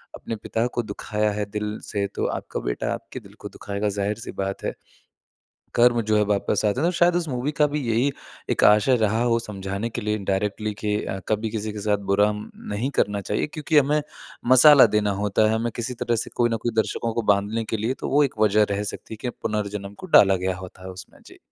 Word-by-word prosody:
अपने 115 - -5
पिता 110 +2 -2
को 120 - -1
दुखाया 105 0 -2
है 105 0 -2
दिल 105 0 -3
से, 100 -2 -2
तो 100 - -4
आपका - - -3
बेटा - - -2
आपके - - -7
दिल - - -16
को - - -7
दुखाएगा, 100 +1 -3
ज़ाहिर 100 +1 -1
सी 115 - -7
बात 95 0 -4
है, - - -2 1.0
कर्म 120 0 +4
जो 110 0 +1
है 105 - +4
वापस 105 +1 0
आते 105 +4 +1
हैं। 165 - +2
तो - - 0
शायद 175 0 +4
उस 175 -1 -1
मूवी 130 +2 -2
का 150 +1 +3
भी 150 +1 -2
यही 120 +5 +2 0.4
एक - - 0
आशय 105 +5 +5
रहा 110 0 +1
हो 120 -1 +2
समझाने 100 0 -4
के - - -4
लिए 105 0 -1
इनडायरेक्टली 105 +2 -2
कि 105 -1 0 0.3
कभी 110 +1 0
किसी 110 -1 -4
के 105 - -7
साथ 105 -1 +2
बुरा 105 +1 +4
म 105 0 -7 0.2
नहीं 115 +7 -1
करना 100 0 0
चाहिए, - - -1
क्योंकि 155 0 +1
हमें 145 +2 +3 0.5
मसाला 135 +1 +9
देना 105 -1 +2
होता 105 +1 +2
है, - - +1
हमें 115 +1 -1
किसी 120 +2 -3
तरह 120 - +1
से - - -4
कोई 120 -1 +2
न - - -2
कोई 120 - -1
दर्शकों 115 +1 0
को 115 - 0
बाँधने 105 +3 -1
के 110 - -2
लिए, 110 +4 -1
तो - - -5
वो 145 +2 +4
एक 135 - -2
वज़ह 105 0 +4
रह 100 0 -1
सकती - - -9
है - - -9
कि 125 - -1
पुनर्जन्म 105 -1 -3
को - - -8
डाला 95 -1 +5
गया 95 0 -2
होता 95 0 -11
है - - -6
उसमें, 95 0 -12
जी। - - -15
105 Hz, 230 wpm, -24 LUFS, 100-120 Hz, 1.0 s, मसाला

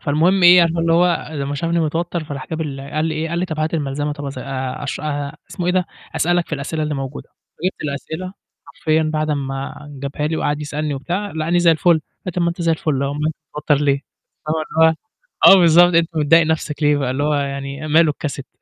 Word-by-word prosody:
فالمهم 170 +6 +2
إيه، 175 +1 +9
عارفة 170 0 +1
اللي 165 0 +2
هو 175 -1 +2
لمّا 140 -1 -3
شافني 165 +3 0
متوتّر 165 +1 -2
فراح 140 -3 -7
جاب 160 0 -3
ال 140 -4 -4
قال 150 +3 -3
لي 160 -1 -1
إيه، 160 +1 -2
قال 170 +1 -2
لي 180 - 0
طَب 160 -4 -5
هات 155 +2 -1
الملزمة 145 -1 -2
طَب 145 0 -7
أذا 135 -2 -6
آآ، 130 -1 -4
أشرَ 140 - -4
آآ، 145 -1 -3
اسمه 175 - -4
إيه 180 - +2
ده، 185 -1 +1 0.3
أسألك 175 0 +1
في - - -3
الأسئلة 150 +2 -3
اللي 150 0 -2
موجودة، 135 0 -6 0.4
جِبت 185 - -2
الأسئلة 160 +6 -5 0.3
حرفيَا 155 0 0
بعد 155 0 -1
أمّا 135 -2 -3 0.3
جابها 140 +2 -2
لي 160 +1 -1
وقاعد 145 -1 -1
يسألني 150 0 -3
وبتاع 175 +9 -3
لقاني 160 +2 0
زي 175 -1 +5
الفُل، 165 +2 +3
قال 160 -2 +4 0.3
لي - - -1
طَب 175 - -1
ما 170 - +2
أنت 170 +1 -4
زي 165 -1 +2
الفُل 155 -4 -1
أهُو 140 - 0
أُومال 150 +1 -2
أنت 160 - -1 0.2
متوتر 150 0 +2
ليه؟ 140 -1 +2 1.5
آه - - +11
بالضبط 175 0 +6
أنت 165 0 +4
متضايق 165 +2 +4
نفسك 160 -1 -2
ليه؟ 145 -3 +2
اللي 130 +3 -2
هو 150 0 +1
يعني 140 +1 -3
ماله 155 0 +4
الcassette 140 -2 -7
155 Hz, 220 wpm, -19 LUFS, 145-170 Hz, 1.5 s, آه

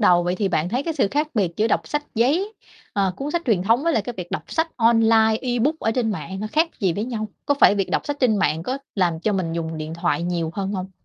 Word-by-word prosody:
đầu. 180 -5 +5
Vậy 175 +1 0
thì 195 0 0
bạn 170 -1 0
thấy 245 +7 -1
cái 325 +1 -3
sự 260 -9 +2
khác 295 +6 0
biệt 185 -6 0
giữa 215 - +2
đọc - - 0
sách 295 0 -2
giấy, 305 - +1 0.4
ờ, 195 -2 +1
cuốn 280 +2 -4
sách 340 +2 -1
truyền 205 -7 +2
thống 230 +6 +3
với 335 - +2
lại 225 - +1
cái 245 - -5
việc 180 -2 -6
đọc - - -3
sách 325 +1 0
online 225 -1 +4
ebook 255 +5 0
ở 225 - +1
trên 225 -1 0
mạng 190 -1 -5
khác 320 +2 +3
gì 185 -4 +2
với 205 +5 -2
nhau? 220 -3 -4 0.2
Có 285 - +3
phải 280 - +6
việc 195 -2 -1
đọc - - -1
sách 290 - -2
trên 235 -4 +3
mạng 160 -5 +1
có 260 +8 -3 0.2
làm 175 -5 +1
cho 215 - 0
mình 185 -4 -1
dùng 165 -1 -3
điện 155 +1 -5
thoại 170 0 0
nhiều 170 -2 -1
hơn 195 0 -2
hông? 190 -1 -4
215 Hz, 270 wpm, -22 LUFS, 180-255 Hz, 0.4 s, phải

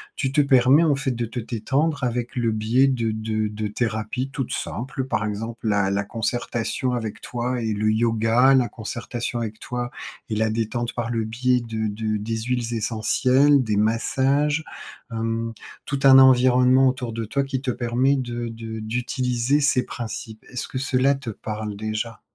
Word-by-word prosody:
tu 135 -2 -1
te 150 - +4
permets 135 +2 +5
en 155 -4 +3
fait 135 -1 -1
de 120 -1 -2
te 115 +2 -5
détendre? 135 +7 -1
Avec 120 +1 -2
le 120 -2 +1
biais 115 +5 +3
de 115 -4 0
de 110 0 -2
de 105 0 -4
thérapies 110 +3 -2
toutes 135 -3 -3
simples, 130 +3 -4
par 110 -5 -1
exemple 110 +2 -4
la 100 -2 +2
la 100 +1 0
concertation 120 +3 -2
avec 110 -3 -4
toi 125 +1 -3
et 110 -1 -1
le 105 +1 0
Yoga. 115 +3 +3
La 125 -3 +3
concertation 120 +2 -4
avec 110 -2 -5
toi 125 0 -4 0.4
et 110 - -1
la 110 +1 +1
détente 115 +2 -2
par 115 -1 -3
le 115 -1 -1
biais 125 +3 +1
de 110 -2 -3
de 110 +1 -2
des 110 +2 -3
huiles 120 -1 -2
essentielles, 130 +5 +3
des 105 -3 -1
massages, 135 +7 +1 0.5
hem, 115 0 -2 0.3
tout 140 - -2
un 135 -1 +9
environnement 130 0 +6
autour 125 -3 -4
de 115 0 -3
toi, 140 +6 0
qui 135 -1 -3
te 130 -2 -1
permet 125 +4 +1
de 120 -2 -3
de 115 -1 -7
d'utiliser 125 +4 0
ces 140 -3 +3
principes. 110 -2 -7
Est-ce 125 - -3
que - - -6
cela 135 0 +2
te 135 -3 -7
parle, 105 0 -5
déjà? 110 +1 -4
120 Hz, 175 wpm, -23 LUFS, 110-130 Hz, 0.5 s, un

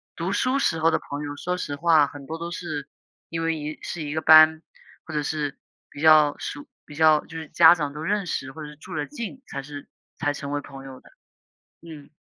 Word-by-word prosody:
读 175 +3 -3
书 255 +6 +1
时 165 -10 +1
候 165 +1 +3
的 - - +1
朋 145 +1 -4
友， 145 0 -6
说 180 +4 -3
实 145 -5 -4
话 160 -1 +4
很 145 -1 -11
多 160 +1 -5
都 170 +1 -6
是 155 -5 -5 0.4
因 165 0 -3
为 165 0 0
一 150 0 -6
是 175 - -6
一 145 - -4
个 160 - -1
班， 155 0 +7 0.4
或 160 - -9
者 150 - 0
是 145 -1 -3 0.3
比 145 - -12
较 155 -2 +6
熟 145 - -7 0.2
比 150 - -12
较 155 -1 +4
就 165 - -9
是 160 - -9
家 165 0 +7
长 145 -4 -3
都 150 - -7
认 200 +3 -1
识 135 -3 -3
或 155 - -10
者 150 - -7
是 150 - -12
住 150 - -10
得 150 - -2
近， 255 -1 -7
才 140 -1 -6
是 145 0 -9 0.3
才 145 -2 0
成 140 0 -6
为 145 - -2
朋 135 -1 -11
友 130 -1 -10
的， - - -20 0.7
嗯。 155 -4 -11
155 Hz, 250 characters per minute, -24 LUFS, 145-165 Hz, 0.7 s, 班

